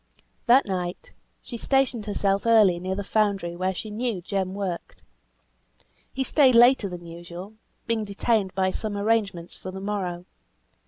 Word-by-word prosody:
That 255 +3 +6
night 180 -2 -4 0.3
she 235 - -7
stationed 250 -4 +1
herself 200 +1 0
early 210 -6 +5
near 185 +1 -3
the 200 - -3
foundry 200 -4 0
where 185 +2 0
she 210 +3 -6
knew 225 -2 -2
Jem 190 +1 -3
worked; 190 -4 -5 1.1
he 265 - -2
stayed 265 -1 +4
later 240 -3 +6
than 175 -1 -8
usual, 175 +4 -9 0.3
being 230 -1 0
detained 200 -1 0
by 190 -1 +1
some 210 +1 -4
arrangements 200 -5 0
for 185 - -8
the 190 +1 -7
morrow. 190 -3 -3
200 Hz, 150 wpm, -25 LUFS, 185-225 Hz, 1.1 s, That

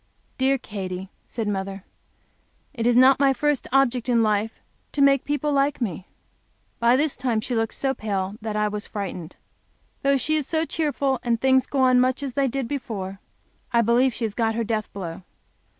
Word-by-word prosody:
"Dear 270 +1 +3
Katy," 190 -5 -6 0.2
said 225 -3 -4
mother, 195 -1 -3 0.9
"it 235 -4 -1
is 240 - +4
not 260 +2 +6
my 275 -1 +4
first 295 0 0
object 260 -2 +2
in 235 -2 +4
life 215 +1 0 0.3
to - - -4
make 275 -1 +4
people 295 +1 -1
like 280 0 +1
me." 190 -6 -3 0.7
By 235 +1 +4
this 295 +2 +1
time 250 -3 0
she 235 +3 -4
looked 225 -1 0
so 270 -1 0
pale 200 -5 -3
that 215 -1 -4
I 210 0 +1
was 210 0 -4
frightened. 185 -5 -6 0.7
Though 275 0 +3
she 310 +4 +1
is 295 - -2
so 320 0 0
cheerful, 285 -5 -1
and 235 -2 0
things 265 0 +3
go 275 - 0
on 255 -1 +5
much 255 +2 +1
as 270 -3 -4
they 275 0 +1
did 265 -1 -2
before, 205 -8 -5 0.5
I 235 -1 +3
believe 240 +3 +3
she 235 - -2
has 215 - -3
got 225 0 0
her 230 - 0
death 215 -1 -2
blow. 175 -4 -6
240 Hz, 190 wpm, -24 LUFS, 210-270 Hz, 0.9 s, not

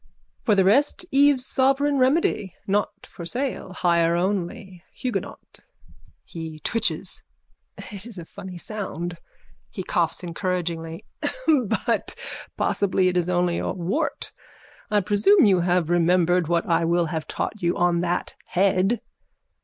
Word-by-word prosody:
For 215 - +3
the 190 -1 +4
rest 275 - +3
Eve's 275 -2 +4
sovereign 275 +2 +2
remedy. 255 - +2
Not 205 +1 -1
for 175 - -10
sale. 245 +2 -3
Hire 170 -2 +2
only. 185 0 -2
Huguenot. 250 -2 -5 0.7
(He 160 -2 -7
twitches.) 230 +5 -1 0.6
It 205 +1 -8
is 225 -5 -10
a 170 - -7
funny 185 0 -9
sound. 175 -3 -5 0.5
(He 190 - -6
coughs 170 0 0
encouragingly.) 170 -2 -3 0.8
But - - -1 0.4
possibly 185 -2 +2
it 180 - -3
is 180 0 +1
only 175 -1 +1
a - - -2
wart. 195 - -2 0.6
I 210 -1 +3
presume 210 - +4
you 195 -3 +5
shall 175 - 0
have 175 -2 +2
remembered 175 0 +3
what 170 0 +1
I 170 0 +2
will 170 +1 +2
have 160 -1 -3
taught 215 - -4
you 170 0 +1
on 175 -1 +2
that 175 0 -1
head? 195 +4 +2
185 Hz, 135 wpm, -24 LUFS, 175-210 Hz, 0.8 s, you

